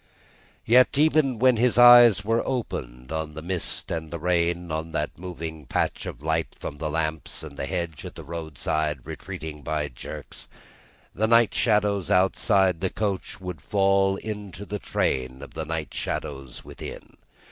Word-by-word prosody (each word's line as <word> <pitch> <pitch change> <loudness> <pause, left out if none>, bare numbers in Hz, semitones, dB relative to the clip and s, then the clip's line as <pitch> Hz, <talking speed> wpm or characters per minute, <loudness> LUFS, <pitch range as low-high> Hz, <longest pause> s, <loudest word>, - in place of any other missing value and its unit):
Yet 125 +4 +5
even 150 -4 +3
when 125 +1 +4
his 120 +1 +2
eyes 120 -4 +8
were 115 +2 +2
opened 65 - -4
on 80 -1 -3
the 80 - -7
mist 90 0 -2
and 80 -1 -4
rain, 85 0 0
on 80 +1 -3
the 75 - -1
moving 80 -5 -7
patch - - -1
of - - -8
light 80 +1 -1
from 70 - -6
the 75 - -2
lamps, 80 0 -2
and 75 -3 -9
the 70 - -4
hedge 85 -2 -3
at - - -8
the - - -9
roadside 80 -3 -2
retreating 75 -1 -7
by 75 +1 -2
jerks, - - -9 0.7
the 110 +4 +1
night 115 -1 +5
shadows 105 -5 +2
outside 95 -1 +3
the 95 - +1
coach 100 -2 -3
would 90 -6 -6
fall 95 0 +2
into 100 -2 -6
the 105 0 -4
train 65 -4 -1
of 70 - -11
the 80 0 -4
night 80 -1 -4
shadows 65 -2 -5
within. - - -9
85 Hz, 160 wpm, -25 LUFS, 80-105 Hz, 0.7 s, eyes